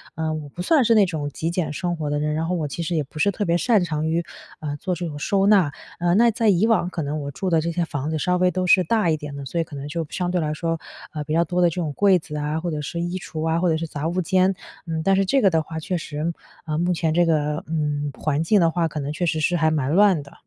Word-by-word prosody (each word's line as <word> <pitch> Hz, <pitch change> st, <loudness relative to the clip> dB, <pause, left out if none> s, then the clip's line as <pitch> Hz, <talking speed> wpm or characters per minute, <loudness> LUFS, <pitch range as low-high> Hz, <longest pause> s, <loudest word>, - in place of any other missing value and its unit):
呃， 160 Hz, 0 st, -1 dB
我 150 Hz, -2 st, -6 dB
不 175 Hz, -, -6 dB
算 300 Hz, -, +4 dB
是 230 Hz, 0 st, +4 dB
那 210 Hz, -3 st, +6 dB
种 155 Hz, -5 st, -3 dB
极 160 Hz, +3 st, -3 dB
简 165 Hz, -4 st, -2 dB
生 175 Hz, +3 st, -2 dB
活 150 Hz, -2 st, -3 dB
的 145 Hz, -, 0 dB
人。 150 Hz, 0 st, -1 dB
然 160 Hz, +2 st, -1 dB
后 180 Hz, -, 0 dB
我 155 Hz, -3 st, -2 dB
其 170 Hz, -, -5 dB
实 170 Hz, +1 st, -2 dB
也 155 Hz, -, +1 dB
不 150 Hz, +3 st, -11 dB
是 200 Hz, -, +3 dB
特 205 Hz, -, -3 dB
别 170 Hz, -1 st, +2 dB
擅 215 Hz, 0 st, +3 dB
长 155 Hz, -2 st, -2 dB
于， 165 Hz, +2 st, 0 dB, 0.4 s
呃， 145 Hz, -2 st, -4 dB
做 180 Hz, +4 st, -2 dB
这 175 Hz, 0 st, -4 dB
种 145 Hz, -2 st, -7 dB
收 195 Hz, +5 st, +1 dB
纳。 195 Hz, -8 st, +5 dB, 0.3 s
呃， 175 Hz, 0 st, +2 dB
那 235 Hz, +2 st, +5 dB
在 225 Hz, +1 st, 0 dB
以 195 Hz, +2 st, +4 dB
往 205 Hz, -6 st, +2 dB
可 175 Hz, -, -4 dB
能 145 Hz, +2 st, -3 dB
我 140 Hz, -, -4 dB
住 185 Hz, +6 st, -3 dB
的 165 Hz, -, +3 dB
这 170 Hz, -, -2 dB
些 170 Hz, +1 st, -1 dB
房 145 Hz, -2 st, -4 dB
子 160 Hz, -, -1 dB
稍 180 Hz, +3 st, +1 dB
微 180 Hz, 0 st, +3 dB
都 185 Hz, +1 st, -1 dB
是 185 Hz, +1 st, +5 dB
大 215 Hz, -1 st, +2 dB
一 155 Hz, -, +2 dB
点 150 Hz, -2 st, -7 dB
的， 140 Hz, -1 st, -6 dB
所 170 Hz, +6 st, -3 dB
以 -, -, +2 dB
可 155 Hz, -, -11 dB
能 140 Hz, +1 st, -6 dB
就 165 Hz, +1 st, -3 dB
相 180 Hz, -1 st, -2 dB
对 180 Hz, -, +1 dB
来 155 Hz, -1 st, -1 dB
说， 165 Hz, +1 st, -2 dB, 0.3 s
呃， 150 Hz, -2 st, -3 dB
比 150 Hz, -, -3 dB
较 170 Hz, +1 st, +4 dB
多 180 Hz, +2 st, -1 dB
的 175 Hz, -, +5 dB
这 165 Hz, -, -7 dB
种 165 Hz, -5 st, -2 dB
柜 195 Hz, +1 st, +4 dB
子 155 Hz, -2 st, -8 dB
啊， 150 Hz, +2 st, -2 dB
或 170 Hz, +1 st, -3 dB
者 150 Hz, -1 st, -3 dB
是 170 Hz, +4 st, -5 dB
衣 175 Hz, +2 st, -2 dB
橱 160 Hz, -2 st, -4 dB
啊， 160 Hz, +1 st, +1 dB
或 180 Hz, 0 st, +2 dB
者 160 Hz, -, +2 dB
是 165 Hz, -, -3 dB
杂 150 Hz, +1 st, -4 dB
物 180 Hz, +2 st, 0 dB
间。 185 Hz, +1 st, +2 dB, 0.3 s
嗯， 160 Hz, -1 st, -2 dB
但 195 Hz, +3 st, +3 dB
是 195 Hz, 0 st, +2 dB
这 270 Hz, +8 st, +2 dB
个 195 Hz, -, +5 dB
的 160 Hz, -2 st, +2 dB
话， 160 Hz, +1 st, -6 dB
确 180 Hz, +3 st, -2 dB
实， 155 Hz, +1 st, -3 dB, 0.3 s
呃， 155 Hz, -2 st, -2 dB
目 175 Hz, +2 st, +1 dB
前 160 Hz, -1 st, 0 dB
这 175 Hz, +1 st, +4 dB
个， 150 Hz, -2 st, 0 dB
嗯， 150 Hz, -2 st, -1 dB
环 150 Hz, -1 st, 0 dB
境 205 Hz, +5 st, +4 dB
的 165 Hz, -, +3 dB
话 170 Hz, -1 st, +1 dB
可 155 Hz, -1 st, -5 dB
能 140 Hz, +1 st, -3 dB
确 175 Hz, -, -1 dB
实 160 Hz, -1 st, 0 dB
是 175 Hz, +3 st, +1 dB
还 160 Hz, 0 st, +3 dB
蛮 145 Hz, -3 st, 0 dB
乱 190 Hz, -4 st, +4 dB
的。 140 Hz, -, -16 dB
165 Hz, 330 characters per minute, -23 LUFS, 150-180 Hz, 0.4 s, 那